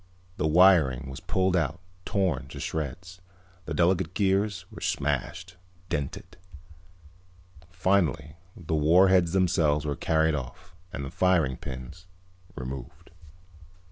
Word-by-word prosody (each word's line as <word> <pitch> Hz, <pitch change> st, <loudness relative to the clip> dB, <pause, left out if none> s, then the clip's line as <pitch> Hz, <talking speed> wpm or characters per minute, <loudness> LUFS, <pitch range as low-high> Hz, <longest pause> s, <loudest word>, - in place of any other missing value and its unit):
The 80 Hz, -, 0 dB
wiring 75 Hz, -7 st, +4 dB
was 65 Hz, -, -7 dB
pulled 95 Hz, -1 st, 0 dB
out, 80 Hz, -1 st, 0 dB, 0.3 s
torn 85 Hz, -9 st, -1 dB
to -, -, -9 dB
shreds. 85 Hz, +4 st, -5 dB, 0.4 s
The -, -, -4 dB
delicate 90 Hz, 0 st, +1 dB
gears 100 Hz, -2 st, 0 dB
were -, -, -11 dB
smashed, 85 Hz, +6 st, -2 dB, 0.3 s
dented. 70 Hz, -2 st, -4 dB, 1.3 s
Finally 90 Hz, -6 st, 0 dB, 0.2 s
the 80 Hz, -2 st, -5 dB
warheads 85 Hz, +3 st, +4 dB
themselves 80 Hz, -6 st, +2 dB
were 75 Hz, -1 st, -2 dB
carried 80 Hz, +1 st, +1 dB
off 90 Hz, +7 st, -7 dB, 0.2 s
and 70 Hz, -6 st, -5 dB
the 70 Hz, -, -7 dB
firing 85 Hz, -8 st, +2 dB
pins 65 Hz, +9 st, -9 dB, 0.5 s
removed. 70 Hz, +5 st, -8 dB
85 Hz, 110 wpm, -27 LUFS, 70-95 Hz, 1.3 s, wiring